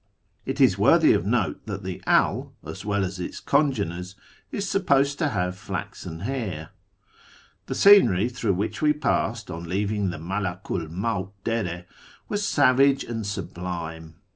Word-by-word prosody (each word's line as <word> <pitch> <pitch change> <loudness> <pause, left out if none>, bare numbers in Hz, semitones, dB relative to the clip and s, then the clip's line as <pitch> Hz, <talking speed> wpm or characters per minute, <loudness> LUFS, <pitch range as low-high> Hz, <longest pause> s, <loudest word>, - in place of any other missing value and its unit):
It - - -3
is - - +4
worthy - - +6
of 90 - 0
note 110 -4 0
that 100 -1 -5
the 95 -1 -5
Al, - - +2
as - - -7
well 100 -1 0
as 90 0 -6
its 90 - -5
congeners, 95 - 0 0.4
is 200 -1 -3
supposed 140 -8 +2
to 155 - +1
have 90 -6 -1
flaxen 95 -4 -6
hair. 100 - -4 1.0
The - - -3
scenery 120 - +6
through 120 -4 -1
which 105 +3 -3
we 150 -1 +4
passed 120 -6 -1
on 85 +1 -6
leaving 100 +1 0
the 85 - -5
Malaku 90 +2 -3
'1 - - -12
Mawt 95 +1 -2
Dere 90 -7 -2 0.4
was 205 0 -2
savage 140 -6 +4
and 115 -3 -4
sublime. 85 -4 -5
100 Hz, 150 wpm, -25 LUFS, 90-125 Hz, 1.0 s, worthy